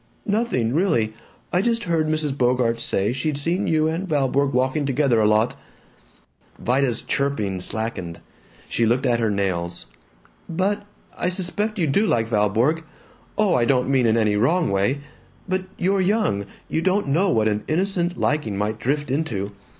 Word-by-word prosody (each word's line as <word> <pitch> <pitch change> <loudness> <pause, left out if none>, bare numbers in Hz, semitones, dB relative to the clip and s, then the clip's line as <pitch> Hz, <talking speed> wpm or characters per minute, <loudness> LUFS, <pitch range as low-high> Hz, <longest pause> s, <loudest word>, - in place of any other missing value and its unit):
"Nothing, 205 - 0
really. 130 - +1 0.4
I 180 - +3
just 230 +2 0
heard 165 -3 0
Mrs. 155 -3 0
Bogart 125 -3 +1
say 105 -1 0
she'd 140 +3 -2
seen 170 +6 0
you 155 -1 +2
and 165 +4 -2
Valborg 140 -2 +1
walking 130 +3 +1
together 135 -3 +2
a 105 - +4
lot." 110 +2 +2 1.0
Vida's 125 -1 0
chirping 110 -9 -1
slackened. 95 -4 -4 0.5
She 115 - +1
looked 125 +4 +1
at 120 -2 +2
her 115 -2 +1
nails. 90 -4 -2 0.6
"But 200 +4 -1 0.3
I 180 - -1
suspect 205 +4 -1
you 175 - +1
do 200 +10 +2
like 115 - +1
Valborg. 115 +9 +1 0.5
Oh, 210 -4 +3
I 125 - +3
don't 125 0 +2
mean 130 -3 +3
in 110 +1 +3
any 105 -2 +2
wrong 160 - +2
way. 100 +9 +1 0.5
But 185 0 -1
you're 195 +2 +1
young; 185 - +1 0.2
you 160 - -1
don't 190 +1 +1
know 180 +8 +2
what 110 -10 +2
an 105 -1 0
innocent 180 +1 0
liking 145 -10 0
might 105 +2 -2
drift 145 +1 -1
into. 115 -9 -2
135 Hz, 160 wpm, -23 LUFS, 110-175 Hz, 1.0 s, a